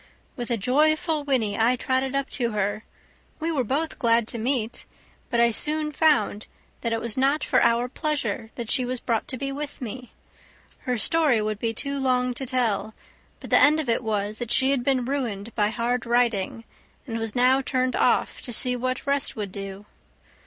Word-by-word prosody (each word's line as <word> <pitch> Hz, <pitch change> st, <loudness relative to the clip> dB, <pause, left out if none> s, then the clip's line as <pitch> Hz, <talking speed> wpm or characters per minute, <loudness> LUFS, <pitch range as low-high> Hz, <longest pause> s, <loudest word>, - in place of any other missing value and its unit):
With 240 Hz, -2 st, -5 dB
a 235 Hz, -, +1 dB
joyful 305 Hz, -, +2 dB
whinny 245 Hz, -8 st, 0 dB
I 235 Hz, +3 st, +4 dB
trotted 260 Hz, +2 st, -1 dB
up 275 Hz, 0 st, 0 dB
to 235 Hz, -4 st, -1 dB
her; 205 Hz, +1 st, -1 dB, 0.6 s
we 330 Hz, +1 st, -1 dB
were 280 Hz, -5 st, 0 dB
both 285 Hz, +7 st, -2 dB
glad 230 Hz, -1 st, +3 dB
to 235 Hz, -, -4 dB
meet, 240 Hz, -1 st, -1 dB, 0.4 s
but 235 Hz, -, 0 dB
I 235 Hz, 0 st, +5 dB
soon 305 Hz, +5 st, +1 dB
found 265 Hz, -9 st, +2 dB, 0.3 s
that 230 Hz, -, -2 dB
it 225 Hz, -, 0 dB
was 235 Hz, 0 st, -2 dB
not 275 Hz, +3 st, +2 dB
for 255 Hz, -, +2 dB
our 235 Hz, +1 st, +3 dB
pleasure 285 Hz, -4 st, -2 dB
that 235 Hz, -3 st, -5 dB
she 255 Hz, -, +2 dB
was 250 Hz, 0 st, -2 dB
brought 230 Hz, -2 st, -1 dB
to 260 Hz, -, -1 dB
be 275 Hz, +2 st, -3 dB
with 285 Hz, +1 st, -6 dB
me. 250 Hz, 0 st, -7 dB, 0.8 s
Her 250 Hz, -1 st, +1 dB
story 295 Hz, -, +3 dB
would 215 Hz, -1 st, -2 dB
be 230 Hz, 0 st, 0 dB
too 280 Hz, +3 st, -2 dB
long 250 Hz, -1 st, +1 dB
to 265 Hz, +2 st, -4 dB
tell, 225 Hz, -4 st, -1 dB, 0.4 s
but -, -, -10 dB
the -, -, +6 dB
end 300 Hz, +2 st, +6 dB
of 290 Hz, -6 st, -3 dB
it 230 Hz, -, +1 dB
was 210 Hz, -1 st, -2 dB
that 240 Hz, -2 st, -4 dB
she 265 Hz, +2 st, +4 dB
had 270 Hz, -3 st, +1 dB
been 255 Hz, -2 st, +1 dB
ruined 235 Hz, -6 st, -3 dB
by 210 Hz, -2 st, +2 dB
hard 235 Hz, +1 st, -2 dB
riding, 235 Hz, -3 st, +1 dB, 0.4 s
and 230 Hz, -4 st, -4 dB
was 225 Hz, 0 st, -3 dB
now 255 Hz, +2 st, +4 dB
turned 255 Hz, -1 st, 0 dB
off -, -, +1 dB
to 245 Hz, -, -6 dB
see 250 Hz, +2 st, +2 dB
what 255 Hz, +1 st, -3 dB
rest 280 Hz, -1 st, +1 dB
would 205 Hz, -3 st, -5 dB
do. 195 Hz, +1 st, -7 dB
245 Hz, 195 wpm, -25 LUFS, 225-275 Hz, 0.8 s, the